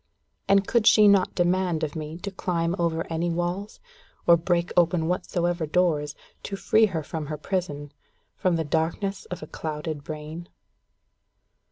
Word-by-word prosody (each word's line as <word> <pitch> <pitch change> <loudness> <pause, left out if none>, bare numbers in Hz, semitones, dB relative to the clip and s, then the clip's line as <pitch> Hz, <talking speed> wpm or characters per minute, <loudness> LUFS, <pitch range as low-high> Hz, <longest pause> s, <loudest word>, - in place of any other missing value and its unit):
And 195 0 +4
could 230 -2 +2
she 215 -2 +7
not 200 -2 +4
demand 175 -2 +1
of 155 0 -3
me 155 0 -5
to 200 - -3
climb 170 -2 -1
over 165 -1 0
any 165 +2 0
walls, 175 +4 -3 0.5
or 170 - +7
break 170 0 0
open 170 -2 +3
whatsoever 175 -1 -1
doors, 150 -3 +1 0.3
to 200 - -5
free 220 +2 +3
her 160 -5 -3
from 155 0 -5
her 150 0 -4
prison 150 -4 -3 0.4
from 180 -2 +1
the 165 - 0
darkness 165 +6 -1
of 180 -3 -7
a - - -5
clouded 155 -1 -5
brain? 155 +3 -7
170 Hz, 155 wpm, -25 LUFS, 160-185 Hz, 0.5 s, she